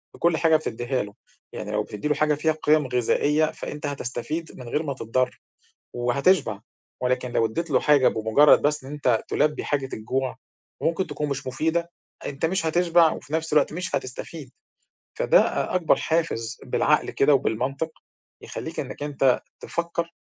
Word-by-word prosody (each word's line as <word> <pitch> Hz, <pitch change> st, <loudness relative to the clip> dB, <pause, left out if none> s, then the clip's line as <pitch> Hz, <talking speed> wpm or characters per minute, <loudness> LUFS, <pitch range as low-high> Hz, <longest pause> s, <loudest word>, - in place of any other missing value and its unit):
بكل 170 Hz, -1 st, +2 dB
حاجة 160 Hz, 0 st, +4 dB
بتدّيها 125 Hz, -4 st, -1 dB
له. 100 Hz, 0 st, -10 dB, 0.4 s
يعني 105 Hz, -, -5 dB
لو 105 Hz, 0 st, 0 dB
بتدّي 105 Hz, +6 st, -5 dB
له 150 Hz, -, +2 dB
حاجة 150 Hz, +1 st, +2 dB
فيها 160 Hz, +2 st, +1 dB
قِيَم 150 Hz, -2 st, +4 dB
غذائية، 145 Hz, +5 st, +2 dB
فأنت 150 Hz, -, -7 dB
هتستفيد 145 Hz, +3 st, -4 dB
من 125 Hz, -2 st, -9 dB
غير 150 Hz, +6 st, 0 dB
ما 140 Hz, -3 st, -2 dB
تتضر 130 Hz, 0 st, -1 dB, 0.5 s
وهتشبع، 120 Hz, -, +2 dB, 0.4 s
ولكن 125 Hz, 0 st, 0 dB
لو 115 Hz, -, +2 dB
ادّيت 165 Hz, +10 st, -3 dB
له 130 Hz, -, +4 dB
حاجة 145 Hz, -3 st, +4 dB
بمُجرّد 110 Hz, +7 st, +5 dB
بس 150 Hz, -1 st, 0 dB
إن 135 Hz, -, -9 dB
أنت 130 Hz, -6 st, +1 dB
تُلبّي 150 Hz, 0 st, +1 dB
حاجة 135 Hz, -2 st, -1 dB
الجوع 130 Hz, +4 st, -2 dB, 0.5 s
وممكن 170 Hz, +2 st, 0 dB
تكون 150 Hz, -1 st, -3 dB
مش 135 Hz, -1 st, -4 dB
مفيدة، 160 Hz, +6 st, -1 dB, 0.3 s
أنت 140 Hz, +2 st, -2 dB
مش 175 Hz, 0 st, 0 dB
هتشبع 170 Hz, 0 st, +4 dB
وفي 145 Hz, -, -8 dB
نَفْس 160 Hz, -1 st, -1 dB
الوقت 150 Hz, -, +3 dB
مش 180 Hz, +2 st, -2 dB
هتستفيد، 130 Hz, +2 st, -6 dB, 0.7 s
فده -, -, +5 dB
أ -, -, -1 dB
أكبر 175 Hz, -3 st, +3 dB
حافز 160 Hz, -9 st, -1 dB
بالعقل -, -, +1 dB
كده 145 Hz, +2 st, +4 dB
وبالمنطق 135 Hz, +5 st, 0 dB, 0.5 s
يخلّيك -, -, -6 dB
إنّك -, -, -5 dB
أنت 135 Hz, -3 st, +2 dB, 0.2 s
تفكّر 170 Hz, 0 st, -3 dB
145 Hz, 160 wpm, -24 LUFS, 125-160 Hz, 0.7 s, بمُجرّد